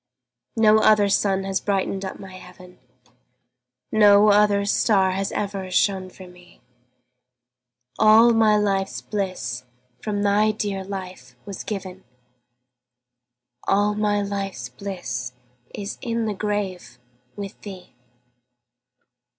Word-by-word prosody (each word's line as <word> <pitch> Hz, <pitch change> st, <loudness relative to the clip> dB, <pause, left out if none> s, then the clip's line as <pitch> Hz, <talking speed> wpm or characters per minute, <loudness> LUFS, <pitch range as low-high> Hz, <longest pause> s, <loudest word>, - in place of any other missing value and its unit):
No 220 Hz, -1 st, +5 dB
other 215 Hz, -2 st, +4 dB
sun 195 Hz, -1 st, +1 dB
has 195 Hz, 0 st, -2 dB
brightened 195 Hz, -1 st, -1 dB
up 190 Hz, -, -6 dB
my 190 Hz, -1 st, -11 dB
heaven, 180 Hz, -2 st, -14 dB, 1.1 s
No 210 Hz, -1 st, +6 dB
other 205 Hz, -1 st, +3 dB
star 200 Hz, -2 st, +2 dB
has 195 Hz, +1 st, -2 dB
ever 195 Hz, -2 st, -4 dB
shone 185 Hz, 0 st, +1 dB
for 185 Hz, 0 st, -13 dB
me; 180 Hz, 0 st, -18 dB, 1.4 s
All 220 Hz, +2 st, +6 dB
my 220 Hz, -2 st, +4 dB
life's 195 Hz, -2 st, -1 dB
bliss 185 Hz, -, -4 dB, 0.4 s
from 205 Hz, -1 st, -2 dB
thy 205 Hz, +1 st, +3 dB
dear 200 Hz, -2 st, -3 dB
life 185 Hz, -10 st, -8 dB
was 200 Hz, -2 st, -7 dB
given, 190 Hz, -3 st, -6 dB, 1.6 s
All 205 Hz, +1 st, +2 dB
my 205 Hz, -1 st, 0 dB
life's 195 Hz, -11 st, -4 dB
bliss 125 Hz, -6 st, -6 dB, 0.4 s
is 200 Hz, 0 st, -6 dB
in 230 Hz, -2 st, -2 dB
the 215 Hz, -, -1 dB
grave 195 Hz, -, -4 dB, 0.4 s
with 200 Hz, -1 st, -8 dB
thee. 190 Hz, -7 st, -11 dB
200 Hz, 110 wpm, -23 LUFS, 185-210 Hz, 1.6 s, No